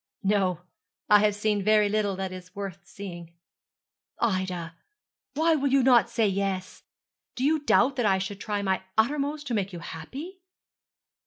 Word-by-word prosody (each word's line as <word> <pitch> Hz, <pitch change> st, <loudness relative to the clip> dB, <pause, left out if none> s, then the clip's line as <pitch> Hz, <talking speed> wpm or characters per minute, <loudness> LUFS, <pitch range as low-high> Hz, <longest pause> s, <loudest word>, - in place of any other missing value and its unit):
'No. 190 Hz, -4 st, +1 dB, 0.5 s
I 210 Hz, -, +9 dB
have 210 Hz, 0 st, +2 dB
seen 210 Hz, 0 st, 0 dB
very 210 Hz, +1 st, +4 dB
little 205 Hz, -1 st, 0 dB
that 190 Hz, 0 st, -4 dB
is 185 Hz, 0 st, -10 dB
worth 200 Hz, -3 st, -5 dB
seeing.' 175 Hz, -4 st, -9 dB, 0.8 s
'Ida, 185 Hz, -6 st, -1 dB, 0.6 s
why 325 Hz, +2 st, +3 dB
will 285 Hz, -2 st, +1 dB
you 275 Hz, -1 st, +4 dB
not 245 Hz, -2 st, +5 dB
say 225 Hz, -2 st, +1 dB
yes? 195 Hz, -1 st, -2 dB, 0.5 s
Do 250 Hz, -, -3 dB
you 310 Hz, +3 st, +3 dB
doubt 275 Hz, -2 st, +3 dB
that 245 Hz, -, +1 dB
I 190 Hz, -1 st, +3 dB
should 190 Hz, +1 st, -4 dB
try 205 Hz, -1 st, -2 dB
my 190 Hz, -1 st, 0 dB, 0.2 s
uttermost 290 Hz, +5 st, +1 dB
to 255 Hz, -, -3 dB
make 200 Hz, -3 st, -1 dB
you 175 Hz, -, -7 dB
happy?' 270 Hz, -, -8 dB
205 Hz, 160 wpm, -27 LUFS, 190-250 Hz, 0.8 s, I